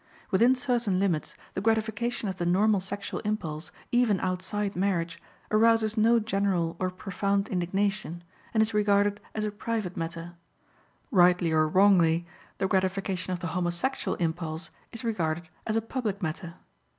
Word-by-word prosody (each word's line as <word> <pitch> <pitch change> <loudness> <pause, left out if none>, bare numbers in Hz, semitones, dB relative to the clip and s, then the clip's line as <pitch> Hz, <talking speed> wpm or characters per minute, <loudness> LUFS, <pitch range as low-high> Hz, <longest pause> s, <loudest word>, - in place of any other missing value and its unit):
Within 235 +7 +5
certain 240 -7 0
limits, 175 -6 0 0.2
the 190 - -3
gratification 220 +1 0
of 190 -1 -3
the 175 - -2
normal 200 +3 +3
sexual 200 +2 -4
impulse, 175 -8 -3 0.2
even 240 -5 +3
outside 190 +2 -2
marriage, 175 -3 -1 0.3
arouses 220 0 +4
no 230 +2 +4
general 195 -6 0
or 185 - 0
profound 195 +2 -1
indignation; 190 -1 -1 0.3
and 220 -1 +4
is 220 - -2
regarded 205 0 +3 0.2
as 215 - -1
a 210 - -1
private 210 -3 -3
matter; 165 +1 -5 0.8
rightly 180 -4 +4
or 155 0 +3
wrongly, 175 -2 +4 0.3
the 190 - 0
gratification 190 -1 0
of 180 -2 -3
the 175 - -2
homosexual 180 +9 -1
impulse 165 -1 -3 0.2
is 230 - -7
regarded 170 -7 -1 0.2
as 220 - 0
a 225 - +1
public 225 -4 -3
matter. 170 +1 -4
195 Hz, 145 wpm, -28 LUFS, 175-215 Hz, 0.8 s, Within